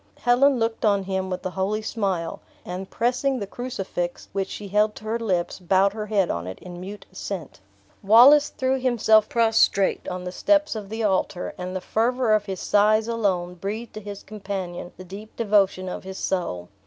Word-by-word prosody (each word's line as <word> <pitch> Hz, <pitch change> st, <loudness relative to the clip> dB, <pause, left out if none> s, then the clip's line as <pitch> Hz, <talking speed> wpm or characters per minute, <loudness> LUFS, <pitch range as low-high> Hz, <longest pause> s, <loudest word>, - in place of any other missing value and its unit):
'" 100 Hz, -, -36 dB
Helen 255 Hz, +3 st, +5 dB
looked 225 Hz, -1 st, -1 dB
on 200 Hz, -3 st, +3 dB
him 190 Hz, 0 st, -2 dB
with 185 Hz, 0 st, -4 dB
a 185 Hz, -, -2 dB
holy 200 Hz, +4 st, -1 dB
smile; 190 Hz, -7 st, -2 dB, 0.3 s
and 185 Hz, +2 st, -6 dB
pressing 255 Hz, +3 st, 0 dB
the 205 Hz, -, -3 dB
crucifix 195 Hz, -6 st, -5 dB
which 195 Hz, -1 st, -1 dB
she 205 Hz, -, -7 dB
held 210 Hz, +2 st, +2 dB
to -, -, -11 dB
her 220 Hz, +2 st, -2 dB
lips, 185 Hz, -7 st, -1 dB
bowed 190 Hz, +2 st, +3 dB
her 215 Hz, -1 st, -5 dB
head 200 Hz, -4 st, +1 dB
on 85 Hz, +1 st, -4 dB
it 95 Hz, -, -6 dB
in 175 Hz, -1 st, -10 dB
mute 200 Hz, +2 st, -8 dB
assent. 185 Hz, -, -6 dB, 0.4 s
Wallace 255 Hz, +9 st, +7 dB
threw 260 Hz, 0 st, -1 dB
himself 220 Hz, -4 st, +3 dB
prostrate 225 Hz, -4 st, +2 dB
on 180 Hz, 0 st, -4 dB
the 180 Hz, -, -5 dB
steps 300 Hz, +8 st, +2 dB
of 210 Hz, -3 st, -6 dB
the 220 Hz, +1 st, -3 dB
altar; 190 Hz, -3 st, 0 dB
and 180 Hz, +1 st, -6 dB
the 185 Hz, -, -2 dB
fervor 240 Hz, +2 st, +1 dB
of 210 Hz, -1 st, +2 dB
his 190 Hz, -2 st, -4 dB
sighs 215 Hz, +2 st, +3 dB
alone 190 Hz, -6 st, 0 dB
breathed 205 Hz, +6 st, -5 dB
to 215 Hz, -, -7 dB
his 205 Hz, -1 st, -8 dB
companion 195 Hz, -4 st, -6 dB
the 185 Hz, -, -9 dB
deep 205 Hz, +4 st, -10 dB
devotion 200 Hz, -4 st, +2 dB
of 180 Hz, -, -5 dB
his 190 Hz, 0 st, -7 dB
soul. 130 Hz, -, -2 dB
200 Hz, 190 wpm, -24 LUFS, 185-225 Hz, 0.4 s, Wallace